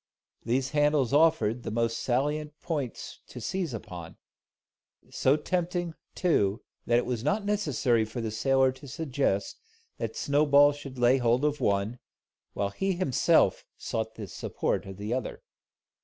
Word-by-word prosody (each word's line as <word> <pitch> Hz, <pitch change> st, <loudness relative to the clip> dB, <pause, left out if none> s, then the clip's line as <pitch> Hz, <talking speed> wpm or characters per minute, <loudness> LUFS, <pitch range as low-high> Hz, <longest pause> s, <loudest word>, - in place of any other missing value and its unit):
These 130 Hz, +3 st, 0 dB
handles 145 Hz, -3 st, +2 dB
offered 125 Hz, -7 st, +3 dB
the -, -, -5 dB
most 115 Hz, 0 st, 0 dB
salient 150 Hz, +4 st, -1 dB
points 145 Hz, -8 st, -4 dB
to -, -, -9 dB
seize 175 Hz, -, -2 dB
upon; 90 Hz, -7 st, -8 dB, 0.9 s
so 135 Hz, +3 st, +3 dB
tempting, 175 Hz, +1 st, -2 dB, 0.2 s
too, 110 Hz, -, +1 dB, 0.2 s
that 120 Hz, -, +4 dB
it 120 Hz, -, +1 dB
was 120 Hz, -3 st, -2 dB
not 200 Hz, +9 st, 0 dB
necessary 145 Hz, -, +1 dB
for 110 Hz, +3 st, -6 dB
the 115 Hz, -2 st, -3 dB
sailor 135 Hz, +4 st, +3 dB
to 130 Hz, +2 st, -13 dB
suggest 135 Hz, -, -1 dB, 0.4 s
that -, -, -3 dB
Snowball 145 Hz, 0 st, +4 dB
should 140 Hz, -2 st, -9 dB
lay 125 Hz, +2 st, +4 dB
hold 120 Hz, +3 st, +2 dB
of 150 Hz, 0 st, 0 dB
one, 100 Hz, +4 st, 0 dB, 0.5 s
while 100 Hz, 0 st, -1 dB
he 195 Hz, -, -1 dB
himself 175 Hz, -8 st, +3 dB
sought 110 Hz, 0 st, -3 dB
the 110 Hz, -, -6 dB
support 95 Hz, -, -3 dB
of 95 Hz, -1 st, -8 dB
the 105 Hz, +3 st, -3 dB
other. 125 Hz, -3 st, -4 dB
130 Hz, 145 wpm, -28 LUFS, 115-150 Hz, 0.9 s, that